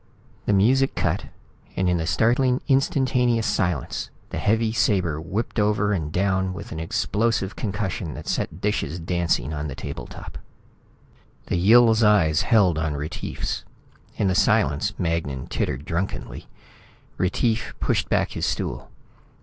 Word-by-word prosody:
The 105 Hz, -, +3 dB
music 130 Hz, +7 st, +3 dB
cut, -, -, -1 dB, 0.5 s
and 95 Hz, -, +1 dB
in 90 Hz, -1 st, +2 dB
the 80 Hz, -1 st, -2 dB
startling 125 Hz, +6 st, +2 dB
instantaneous 125 Hz, -4 st, +2 dB
silence, 90 Hz, -, -1 dB, 0.2 s
the -, -, -3 dB
heavy 110 Hz, +1 st, +2 dB
sabre 95 Hz, -9 st, +1 dB
whipped 100 Hz, +7 st, -3 dB
over 105 Hz, 0 st, +2 dB
and 80 Hz, -5 st, -2 dB
down 95 Hz, +1 st, 0 dB
with 100 Hz, +4 st, -8 dB
an 80 Hz, -, -5 dB
explosive 105 Hz, +5 st, 0 dB
concussion 95 Hz, -, -3 dB
that -, -, -9 dB
set 80 Hz, -, -2 dB
dishes 90 Hz, -5 st, -1 dB
dancing 85 Hz, -5 st, 0 dB
on 75 Hz, 0 st, -3 dB
the 70 Hz, -, -6 dB
table -, -, -6 dB
top. -, -, -9 dB, 1.1 s
The -, -, -1 dB
Yill's 110 Hz, +4 st, +6 dB
eyes 95 Hz, -8 st, +4 dB
held 95 Hz, -8 st, +3 dB
on 80 Hz, -2 st, -1 dB
Retief's. 75 Hz, +2 st, -4 dB, 0.5 s
In 105 Hz, -, +1 dB
the 95 Hz, -, +2 dB
silence, 105 Hz, -3 st, +2 dB
Magnan 80 Hz, -6 st, -2 dB
tittered 65 Hz, +4 st, -3 dB
drunkenly. 85 Hz, +4 st, -4 dB, 0.7 s
Retief 110 Hz, +5 st, 0 dB
pushed -, -, 0 dB
back -, -, +1 dB
his -, -, -2 dB
stool. -, -, -3 dB
95 Hz, 140 wpm, -24 LUFS, 80-110 Hz, 1.1 s, Yill's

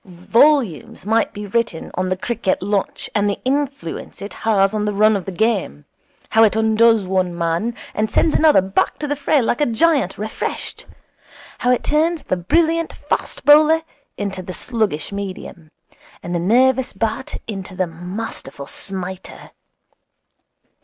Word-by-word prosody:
Volumes 205 Hz, -, +1 dB
might 225 Hz, +2 st, +2 dB
be 210 Hz, 0 st, -7 dB
written 225 Hz, -4 st, -2 dB
on 185 Hz, +1 st, -1 dB
the 185 Hz, -, -1 dB
cricket 215 Hz, -3 st, -1 dB
lunch 200 Hz, 0 st, -2 dB
and 205 Hz, -1 st, +2 dB
the 200 Hz, -, -2 dB
influence 275 Hz, -, -3 dB
it 200 Hz, -, -7 dB
has 200 Hz, -2 st, +2 dB
on 210 Hz, -1 st, -1 dB
the 210 Hz, -, -1 dB
run 215 Hz, +1 st, +4 dB
of 195 Hz, -, -3 dB
the 195 Hz, -, -4 dB
game; 190 Hz, -, -1 dB, 0.5 s
how 225 Hz, -, +6 dB
it 215 Hz, -1 st, +4 dB
undoes 220 Hz, -1 st, +4 dB
one 185 Hz, -2 st, -1 dB
man, 170 Hz, +8 st, -1 dB, 0.2 s
and 215 Hz, +1 st, 0 dB
sends 320 Hz, -, +2 dB
another 305 Hz, -8 st, +5 dB
back 190 Hz, +1 st, 0 dB
to 295 Hz, -, -4 dB
the 290 Hz, -, -1 dB
fray 285 Hz, -1 st, +2 dB
like 235 Hz, -, 0 dB
a 295 Hz, -, +3 dB
giant 265 Hz, -, +2 dB
refreshed; 215 Hz, +1 st, -5 dB, 0.7 s
how 245 Hz, -, 0 dB
it 250 Hz, -, +1 dB
turns 315 Hz, +2 st, +1 dB
the -, -, -1 dB
brilliant 330 Hz, -, +1 dB
fast -, -, -4 dB
bowler 310 Hz, +2 st, +6 dB, 0.3 s
into 195 Hz, -2 st, -3 dB
the 185 Hz, 0 st, -7 dB
sluggish 215 Hz, -9 st, -2 dB
medium, 190 Hz, -4 st, -7 dB, 0.5 s
and 175 Hz, -, -4 dB
the 175 Hz, -, 0 dB
nervous 255 Hz, +7 st, +3 dB
bat 225 Hz, +5 st, -3 dB
into 195 Hz, -3 st, -7 dB
the 185 Hz, -, 0 dB
masterful 175 Hz, -4 st, -7 dB
smiter. 190 Hz, +3 st, -7 dB
210 Hz, 155 wpm, -20 LUFS, 185-250 Hz, 0.7 s, how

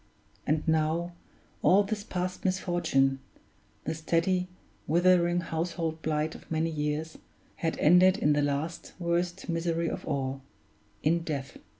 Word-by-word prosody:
And 155 Hz, +1 st, 0 dB
now, 160 Hz, +2 st, +1 dB, 0.5 s
all 195 Hz, +3 st, +5 dB
this 205 Hz, 0 st, -3 dB
past 180 Hz, -1 st, -3 dB
misfortune 170 Hz, -8 st, +1 dB, 0.6 s
the -, -, -2 dB
steady, 170 Hz, +3 st, +1 dB, 0.4 s
withering, 175 Hz, +1 st, +4 dB
household 165 Hz, -1 st, -3 dB
blight 155 Hz, 0 st, -1 dB
of -, -, -13 dB
many 160 Hz, +1 st, 0 dB
years 150 Hz, +1 st, -3 dB, 0.4 s
had 165 Hz, -1 st, -1 dB
ended 180 Hz, +4 st, +6 dB
in 150 Hz, -6 st, +3 dB
the 145 Hz, -, +2 dB
last, 145 Hz, +4 st, -2 dB
worst 175 Hz, +1 st, -1 dB
misery 165 Hz, -1 st, 0 dB
of -, -, -5 dB
all 135 Hz, -2 st, -2 dB, 0.6 s
in 165 Hz, +3 st, +3 dB
death. 150 Hz, -5 st, -5 dB
165 Hz, 125 wpm, -29 LUFS, 155-175 Hz, 0.6 s, ended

